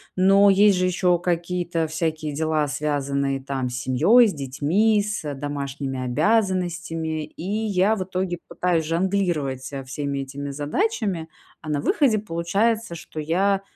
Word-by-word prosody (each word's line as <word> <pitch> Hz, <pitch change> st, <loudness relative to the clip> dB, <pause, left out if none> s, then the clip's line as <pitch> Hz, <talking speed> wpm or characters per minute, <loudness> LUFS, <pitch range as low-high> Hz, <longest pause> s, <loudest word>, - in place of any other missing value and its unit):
но 195 Hz, +2 st, +5 dB
есть 200 Hz, 0 st, +5 dB
же 185 Hz, -, +2 dB
еще 180 Hz, -1 st, +2 dB
какие-то 175 Hz, -1 st, -1 dB
всякие 155 Hz, -1 st, -2 dB
дела, 155 Hz, 0 st, 0 dB
связанные, 140 Hz, -2 st, -1 dB
там, 135 Hz, -2 st, -2 dB
с 125 Hz, -, -5 dB
семьёй, 165 Hz, -, +5 dB
с 200 Hz, -, -2 dB
детьми, 155 Hz, -, +1 dB
с 200 Hz, -8 st, -3 dB
домашними 140 Hz, -1 st, -4 dB
обязанностями, 175 Hz, -, 0 dB
и 155 Hz, -, -11 dB, 0.2 s
я 200 Hz, +1 st, +2 dB
в 190 Hz, -, -2 dB
итоге 185 Hz, -1 st, -3 dB
пытаюсь 175 Hz, -3 st, 0 dB
жонглировать 165 Hz, -6 st, 0 dB
со 135 Hz, 0 st, -6 dB
всеми 140 Hz, +1 st, -4 dB
этими 140 Hz, +1 st, -5 dB
задачами. 170 Hz, -, -1 dB, 0.3 s
А 155 Hz, -, -8 dB
на 145 Hz, -1 st, 0 dB
выходе 225 Hz, -, +2 dB
получается, 205 Hz, +3 st, 0 dB
что 160 Hz, -1 st, -8 dB
я, 190 Hz, +6 st, +1 dB
165 Hz, 140 wpm, -23 LUFS, 145-190 Hz, 0.3 s, но